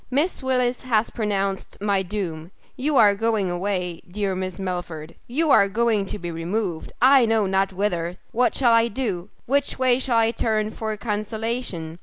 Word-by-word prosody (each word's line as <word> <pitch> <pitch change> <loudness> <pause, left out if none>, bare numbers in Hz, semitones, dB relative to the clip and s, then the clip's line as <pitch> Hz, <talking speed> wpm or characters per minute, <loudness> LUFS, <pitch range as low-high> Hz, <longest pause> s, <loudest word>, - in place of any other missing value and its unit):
Miss 290 +8 0
Willis 250 -2 0
has 225 -3 +1
pronounced 200 -3 -2
my 200 -1 +1
doom 175 -5 -4 0.3
you 280 +2 0
are 205 -3 +7
going 210 -3 0
away, 180 -2 -2
dear 200 +1 -2
Miss 185 0 -4
Melford! 175 -4 -5
you 300 +5 +1
are 200 -5 +6
going 220 -1 +1
to - - -5
be 175 -3 -5
removed, 170 +1 -3
I 260 -2 +7
know 220 -2 +2
not 195 0 +1
whither! 180 -3 -2
what 240 0 +2
shall 240 -4 +4
I 230 0 +5
do? 205 -6 -3 0.2
which 280 +2 0
way 255 -1 +3
shall 255 -3 0
I 225 0 +4
turn 215 -2 0
for 220 -1 -4
consolation? 215 -5 -3
210 Hz, 170 wpm, -23 LUFS, 185-235 Hz, 0.3 s, are